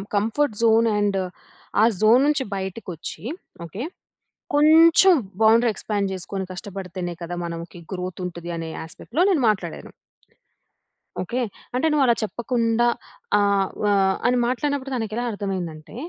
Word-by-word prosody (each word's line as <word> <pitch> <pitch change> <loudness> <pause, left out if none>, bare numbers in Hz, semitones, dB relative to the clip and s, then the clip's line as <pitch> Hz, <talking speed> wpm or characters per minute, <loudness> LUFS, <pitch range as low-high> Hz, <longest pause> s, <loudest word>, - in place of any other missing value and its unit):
Comfort 225 +6 +1
zone 225 0 +5
and 205 -1 +1 0.6
ఆ - - +6 0.2
zone 225 +4 +6
నుంచి 290 -3 +2
బయటకి 190 +2 -5
వచ్చి 160 - -8 0.4
ఓకే. 190 +8 -7 0.7
కొంచెం 325 +5 +7 0.3
బౌండరీ 230 +2 +5
ఎక్స్‌పాండ్ 200 -1 -2
చేసుకొని 190 +1 -4
కష్టపడితేనే 180 -2 -6
కదా! 175 +1 -5
మనం 170 -1 -4
కి - - -11
గ్రోత్ 185 0 -5
ఉంటది 175 -1 -7
అనే 165 -1 -5
యాస్పెక్ట్‌లో 230 - -3
నేను 325 -8 +2
మాట్లాడాను. 180 -5 -4 1.3
ఓకే. 240 +8 -2 0.3
అంటే 280 +6 +2
నువ్వలా 265 -5 +4
చెప్పకుండా 235 +1 0 0.5
ఆహ్, 200 -1 +2
వా 205 -1 +3 0.3
అని 250 - +3
మాట్లాడినప్పుడు 275 +1 -1
తనకి 225 -3 -3
ఎలా 240 - -1
అర్థమయిందంటే 185 -5 -5
210 Hz, 125 wpm, -23 LUFS, 185-245 Hz, 1.3 s, కొంచెం